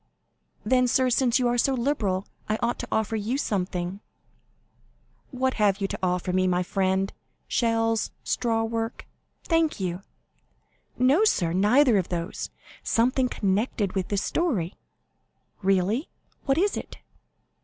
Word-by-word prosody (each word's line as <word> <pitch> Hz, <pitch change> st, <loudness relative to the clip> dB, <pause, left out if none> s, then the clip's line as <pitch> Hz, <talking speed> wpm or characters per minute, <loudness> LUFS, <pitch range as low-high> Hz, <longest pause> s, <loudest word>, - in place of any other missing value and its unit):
"Then, 255 Hz, -1 st, +3 dB
sir, 255 Hz, +1 st, +2 dB
since 245 Hz, 0 st, +3 dB
you 250 Hz, -2 st, +1 dB
are 240 Hz, 0 st, +1 dB
so 270 Hz, +3 st, +2 dB
liberal, 220 Hz, -7 st, 0 dB, 0.2 s
I 215 Hz, -, +1 dB
ought 240 Hz, +1 st, 0 dB
to -, -, -4 dB
offer 220 Hz, 0 st, 0 dB
you 220 Hz, +5 st, -1 dB
something." 185 Hz, -5 st, -2 dB, 1.3 s
50227m 255 Hz, -, -9 dB
"What 260 Hz, 0 st, +2 dB
have 205 Hz, -2 st, +2 dB
you 195 Hz, -, 0 dB
to -, -, -4 dB
offer 180 Hz, 0 st, 0 dB
to -, -, -1 dB
me, 185 Hz, 0 st, +3 dB
my 180 Hz, 0 st, +1 dB
friend? 190 Hz, +1 st, 0 dB, 0.3 s
Shells? 225 Hz, -1 st, +1 dB
Straw 225 Hz, -2 st, 0 dB
work? 225 Hz, +1 st, -3 dB, 0.4 s
Thank 330 Hz, -5 st, +1 dB
you!" 180 Hz, -1 st, -3 dB, 1.0 s
"No, 270 Hz, +11 st, +4 dB
sir, 175 Hz, -, +2 dB
neither 215 Hz, +4 st, +4 dB
of 180 Hz, -, -3 dB
those; 170 Hz, -1 st, -4 dB, 0.3 s
something 250 Hz, +2 st, +2 dB
connected 205 Hz, 0 st, 0 dB
with 190 Hz, -2 st, -1 dB
this 200 Hz, -1 st, -1 dB
story." 220 Hz, -, 0 dB, 0.9 s
"Really? 195 Hz, -, +1 dB, 0.4 s
What 270 Hz, 0 st, +2 dB
is 400 Hz, +4 st, +2 dB
it?" -, -, -7 dB
225 Hz, 145 wpm, -26 LUFS, 190-255 Hz, 1.3 s, No